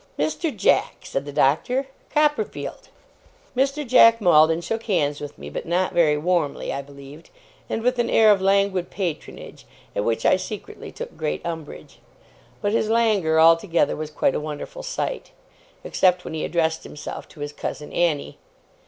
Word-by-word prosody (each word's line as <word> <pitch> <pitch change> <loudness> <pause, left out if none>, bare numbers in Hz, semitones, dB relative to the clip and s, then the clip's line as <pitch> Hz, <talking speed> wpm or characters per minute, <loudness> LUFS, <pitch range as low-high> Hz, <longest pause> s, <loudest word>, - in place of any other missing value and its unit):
'Mr. 330 - -1
Jack!' - - +1
said 135 +1 -3
the 145 - -6
Doctor. 160 - +1 0.2
'Copperfield!' 300 +7 -1 0.7
Mr. 275 +3 0
Jack 230 -2 +7
Maldon 165 -4 +5
shook 225 +6 -4
hands 150 -9 0
with 145 - -8
me; 70 - -9
but 75 - -6
not 180 +2 0
very 155 -3 +3
warmly, 165 -2 -1
I 140 - -3
believed; 140 +3 -13 0.4
and 225 - -2
with 250 0 +1
an 235 - +1
air 220 -1 +6
of 200 -2 +3
languid 195 -2 +2
patronage, 180 -6 -6 0.3
at 100 - 0
which 115 +1 -1
I - - +5
secretly 215 - -8
took 485 0 -8
great 155 - -3
umbrage. 165 -3 -7 0.6
But 205 - +1
his 220 0 +1
languor 210 -9 +2
altogether 165 +2 +4
was 155 0 -5
quite 150 -3 +1
a - - -1
wonderful 150 - -6
sight; - - -4 0.5
except 180 -1 +2
when - - -6
he 160 - -3
addressed 160 -1 0
himself 150 - -8
to 150 - -14
his 145 0 -5
cousin 150 0 -6
Annie. 165 -5 0
175 Hz, 160 wpm, -23 LUFS, 150-225 Hz, 0.7 s, Jack